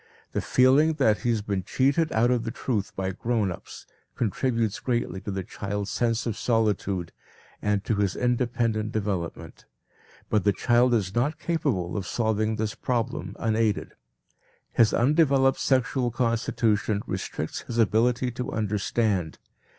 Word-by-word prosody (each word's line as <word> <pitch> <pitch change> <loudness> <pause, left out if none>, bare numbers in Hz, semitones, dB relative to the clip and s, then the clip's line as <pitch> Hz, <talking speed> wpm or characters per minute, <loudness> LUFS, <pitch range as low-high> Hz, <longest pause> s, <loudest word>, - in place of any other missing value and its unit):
The - - -1
feeling 135 +5 +4
that 110 - +2
he 120 - -1
has 110 -3 +1
been 100 -2 -1
cheated 140 - +1
out 120 +3 +3
of 120 -2 +1
the 115 - -3
truth 115 -4 -2
by 95 0 -2
grown 110 0 -1
ups, 85 - -10 0.3
contributes 115 0 0
greatly 120 -6 -2
to - - -6
the 95 -1 -3
child's 100 +2 -4
sense 115 -2 0
of 115 -4 -2
solitude 100 -6 0 0.5
and 105 -1 0
to 110 - 0
his 100 -3 +1
independent 120 -3 0
development. 100 -6 -4 0.6
But 105 -3 +1
the 100 - +3
child 120 +3 +3
is 95 -4 -1
not 145 +8 0
capable 145 - -1
of 100 -4 -3
solving 110 +1 0
this 110 0 -2
problem 125 +4 -2
unaided. 110 -2 0 0.8
His 115 -2 +4
undeveloped 135 0 +3
sexual 130 -1 +1
constitution 115 -3 0
restricts - - -4
his 120 - -6
ability 120 +3 +2
to 125 +1 -4
understand. 105 -4 -1
115 Hz, 145 wpm, -26 LUFS, 105-125 Hz, 0.8 s, feeling